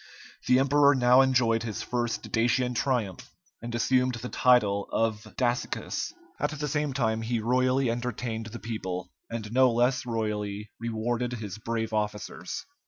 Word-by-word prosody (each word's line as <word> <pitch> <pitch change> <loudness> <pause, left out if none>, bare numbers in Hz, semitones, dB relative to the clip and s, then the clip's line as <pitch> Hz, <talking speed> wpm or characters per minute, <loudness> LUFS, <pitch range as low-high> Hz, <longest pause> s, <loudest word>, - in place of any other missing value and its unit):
The 125 - +6
emperor 140 +1 +5
now 125 0 +6
enjoyed 125 -4 +3
his 110 -3 -4
first 120 -1 -2
Dacian 120 +2 +2
triumph, 125 -1 -1 0.3
and 120 0 -5
assumed 125 +1 +2
the 120 +2 -6
title 105 -6 +3
of 110 -1 0
Dacicus. 120 -1 -1 0.3
At - - +1
the 150 +1 -2
same 150 -1 0
time 115 -4 0
he 115 +1 -1
royally 130 +2 +2
entertained 120 -2 -3
the 115 +1 -7
people, 95 -6 -5 0.2
and 110 -2 -5
no 130 0 +5
less 120 +3 +2
royally 105 -3 -3
rewarded 115 +2 -2
his 105 -4 -6
brave 110 0 -3
officers. 105 -4 -3
120 Hz, 145 wpm, -28 LUFS, 110-125 Hz, 0.3 s, The